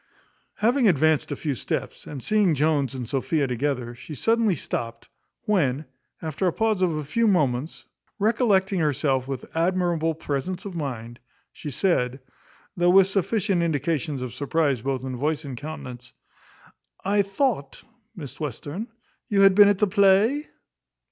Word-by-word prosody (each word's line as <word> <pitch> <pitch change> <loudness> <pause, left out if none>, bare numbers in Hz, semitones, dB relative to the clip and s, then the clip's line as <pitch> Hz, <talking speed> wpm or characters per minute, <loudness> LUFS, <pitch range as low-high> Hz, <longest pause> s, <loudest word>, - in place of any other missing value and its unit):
Having 240 +3 +2
advanced 155 -3 +2
a - - -1
few 150 -3 -2
steps, 125 - -4
and 140 -4 -7
seeing 205 -6 +3
Jones 145 -2 +1
and 125 -3 -5
Sophia 140 +3 0
together, 125 -1 -2
she 150 +5 -9
suddenly 225 - +2
stopt; 115 -4 -5 0.3
when, 155 -8 +1 0.4
after 160 +4 -1
a - - +3
pause 220 0 0
of 175 -4 +2
a 150 - -3
few 225 +11 +1
moments, 150 - 0 0.3
recollecting 200 -3 +2
herself 140 -4 +1
with 135 -2 -5
admirable 170 -2 +1
presence 160 +5 -4
of 200 - -6
mind, 120 -7 -5 0.3
she 150 - -7
said 135 -4 0 0.6
though 175 0 +3
with 190 +1 +7
sufficient 195 -1 0
indications 150 -3 -1
of 125 -2 -6
surprize 140 -1 0
both 130 0 -2
in 130 -1 -4
voice 150 +3 -1
and 135 -3 -6
countenance 125 -4 -8 0.9
"I 205 +1 +3
thought, 195 - -1 0.3
Miss 145 -7 -9
Western, 150 - -5 0.4
you 200 -4 +2
had 195 -1 +7
been 205 +1 +8
at 205 - +2
the 210 - +3
play?" 205 +9 +3
160 Hz, 150 wpm, -24 LUFS, 135-195 Hz, 0.9 s, been